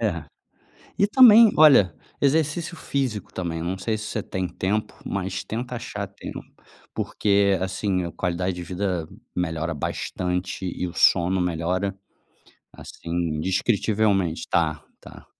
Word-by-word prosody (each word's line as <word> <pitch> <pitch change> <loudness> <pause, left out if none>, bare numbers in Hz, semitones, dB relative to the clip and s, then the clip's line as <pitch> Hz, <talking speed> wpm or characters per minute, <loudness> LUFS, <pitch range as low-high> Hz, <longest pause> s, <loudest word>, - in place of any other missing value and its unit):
É. - - -1 0.8
E 200 - +4
também, 230 -1 +8
olha, 140 - +7 0.3
exercício 160 +4 +1
físico 130 - -3
também, 85 -3 -3
eu 80 - -4
não 95 +2 -2
sei 110 +3 -2
se 110 - -7
você 110 - -3
tem 95 -1 -3
tempo, 105 +5 -2
mas 95 -1 -3
tenta 120 +3 -5
achar 105 -4 -5
tempo, 100 - -8 0.5
porque, 100 -1 +1
assim, 95 0 -1
a 85 - -5
qualidade 90 +2 -2
de 90 - -6
vida 90 -2 -2 0.3
melhora 80 -1 -2
bastante 90 +5 -3
e 90 0 -3
o 85 - -8
sono 90 +1 +3
melhora, 90 +3 -1 0.8
assim, 85 - -11
indescritivelmente, 95 +2 0
tá, 80 -3 0 0.2
tá. - - -13
95 Hz, 135 wpm, -24 LUFS, 90-110 Hz, 0.8 s, também